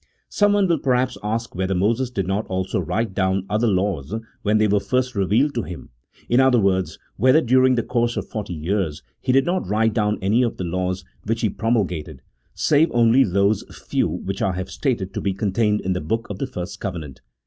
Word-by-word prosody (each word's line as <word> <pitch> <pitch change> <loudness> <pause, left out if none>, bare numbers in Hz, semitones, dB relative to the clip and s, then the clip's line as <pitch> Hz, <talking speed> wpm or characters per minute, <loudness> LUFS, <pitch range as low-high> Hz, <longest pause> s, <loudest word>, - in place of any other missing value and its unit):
Someone 205 -1 +3
will 170 -3 +2
perhaps 125 -1 +1
ask 115 +3 -3
whether 95 +1 -1
Moses 115 +7 +1
did 100 -7 -2
not 95 +3 -1
also 95 0 -2
write 95 +5 -2
down 95 0 0
other 110 +3 +2
laws 95 -4 -1 0.3
when 105 +1 +2
they 110 0 +3
were 105 0 +3
first 125 +4 -1
revealed 110 +8 +2
to 120 - -1
him 90 -4 -8 0.2
— - - -30
in 120 - +3
other 130 -2 +5
words, 95 -5 +1 0.2
whether, 130 +7 +5
during 130 -1 +4
the 120 - 0
course 120 0 0
of - - -3
forty 105 -5 -5
years, 80 -1 -2 0.2
he 130 - 0
did 135 +1 +4
not 175 - -1
write 110 +2 +1
down 105 -1 +1
any 105 +6 +2
of 120 -2 0
the - - -3
laws 90 +1 -2 0.2
which 115 +2 -1
he 110 - +1
promul 115 -1 +1
gated, 75 -5 -7 0.3
save 155 +3 +3
only 120 +3 +5
those 100 0 +1 0.2
few - - +1
which 95 0 -4
I 95 - +1
have 90 0 -5
stated 115 -9 -2
to - - -3
be 95 -2 -1
contained 105 +1 +1
in 95 - -1
the 90 - -3
book 115 +8 -2
of 95 - -6
the 135 - -2
first 90 -8 -6
covenant. 80 -8 -6
105 Hz, 215 wpm, -22 LUFS, 95-120 Hz, 0.3 s, other